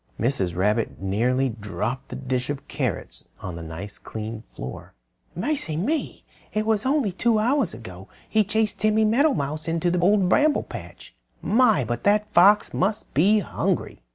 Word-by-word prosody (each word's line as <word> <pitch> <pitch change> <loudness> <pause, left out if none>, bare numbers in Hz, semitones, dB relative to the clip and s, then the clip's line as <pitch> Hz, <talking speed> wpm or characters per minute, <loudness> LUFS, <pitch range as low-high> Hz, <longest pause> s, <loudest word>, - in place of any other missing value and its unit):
Mrs. 100 -8 0
Rabbit 105 +5 0
nearly 120 +8 +1
dropped 115 +4 -4
the - - -6
dish 130 -1 -2
of 145 0 -4
carrots 130 - -3
on 90 -2 -6
the 85 - -7
nice 85 +6 -8
clean 110 0 -6
floor. 65 - -8 0.4
"Mercy 180 - -2
me! 290 - -2 0.3
It 215 0 0
was 220 +2 +1
only 275 -6 +2
about 185 - -11
two 230 -2 +3
hours 235 -2 +1
ago 95 -4 -10 0.2
he 220 -1 +3
chased 215 +1 -1
Timmy 215 0 +3
Meadowmouse 215 - +1
into 170 +1 +1
the 180 - +1
Old 195 +1 +4
Bramble 295 +9 +3
Patch. - - -10 0.3
My! 220 - +4
but 120 +1 -3
that 205 +1 +5
old 210 - -27
fox 200 +4 +5
must 210 +4 -1
be 200 +9 +4
hungry!" - - -2
170 Hz, 165 wpm, -24 LUFS, -, 0.4 s, that